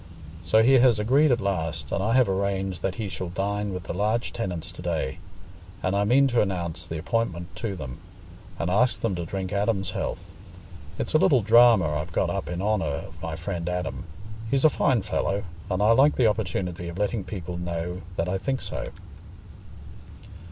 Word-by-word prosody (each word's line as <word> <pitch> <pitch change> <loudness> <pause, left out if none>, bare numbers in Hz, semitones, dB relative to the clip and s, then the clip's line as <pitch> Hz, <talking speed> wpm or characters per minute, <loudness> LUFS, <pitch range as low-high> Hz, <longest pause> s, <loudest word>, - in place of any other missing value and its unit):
So 110 +6 +4
he 130 +2 +6
has 120 -3 +5
agreed 135 +7 +4
at 120 - +3
last, 80 -6 -2
and - - 0
I 110 +4 +1
have 130 -1 +5
arranged 95 -1 -1
that 95 -1 -1
he 110 -3 -3
shall 95 -2 -5
dine 100 +3 -2
with 90 -1 -5
the - - -5
large 110 +3 0
tenants 90 -8 -4
to - - -10
day; 65 - -2 0.6
and 95 - +1
I 100 +1 +2
mean 130 +6 +5
to 120 -1 +3
announce 90 -5 -3
the 80 - -4
appointment 85 -3 -2
to 100 +1 -3
them, 65 -8 -7 0.6
and 85 - -1
ask 120 +6 +2
them 115 -4 0
to 85 -2 -4
drink 95 +1 -4
Adam's 100 -2 0
health. - - -4 0.7
It's - - -3
a 155 - +5
little 130 -8 +4
drama 115 -4 +6
I've 75 - -5
got - - +1
up - - -3
in 90 +1 -3
honour 105 -5 +1 0.2
of - - -16
my - - -4
friend 85 0 -4
Adam. 90 -2 -3 0.4
He's 135 +4 +2
a - - +9
fine 125 -8 +2
fellow, 100 0 -1 0.3
and 95 +1 0
I 110 - +5
like 135 +6 +5
the 125 - +3
opportunity 90 -5 -1
of 85 - -7
letting 105 +1 -1
people 90 -3 -6
know 85 +1 -4
that 85 - -1
I 95 +1 -1
think 135 +6 -2
so." - - -4
100 Hz, 195 wpm, -26 LUFS, 90-115 Hz, 0.7 s, a